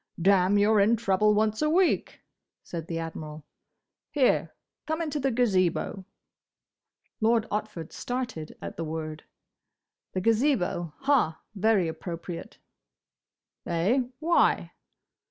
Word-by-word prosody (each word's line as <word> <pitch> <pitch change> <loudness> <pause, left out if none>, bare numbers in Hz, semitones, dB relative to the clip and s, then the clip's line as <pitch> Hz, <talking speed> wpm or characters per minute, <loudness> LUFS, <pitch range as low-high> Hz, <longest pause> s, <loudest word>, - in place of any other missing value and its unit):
"Damme! 190 +2 +4
you're 210 +1 +4
in 210 +4 +4
trouble 210 -1 +2
once 215 0 +1
a 305 - +2
week!" 355 +3 +1 0.4
said 165 -2 -6
the 165 - -3
Admiral. 155 -2 -6 0.6
"Here! 270 -4 +2 0.4
Come 315 +1 -1
into 305 -3 -2
the 270 0 +1
Gazebo." 195 -5 +1 1.1
Lord 225 0 +3
Otford 210 -6 -4
started 245 -11 -4
at - - -6
the 165 - -2
word. 155 -1 -5 0.9
"The 185 - -1
Gazebo?—Ha! 225 - +1
Very 205 -3 +2
appropriate!" 170 +1 -6 1.1
"Eh? 180 +10 +2 0.2
Why?" 335 +3 +2
205 Hz, 105 wpm, -27 LUFS, 170-245 Hz, 1.1 s, Damme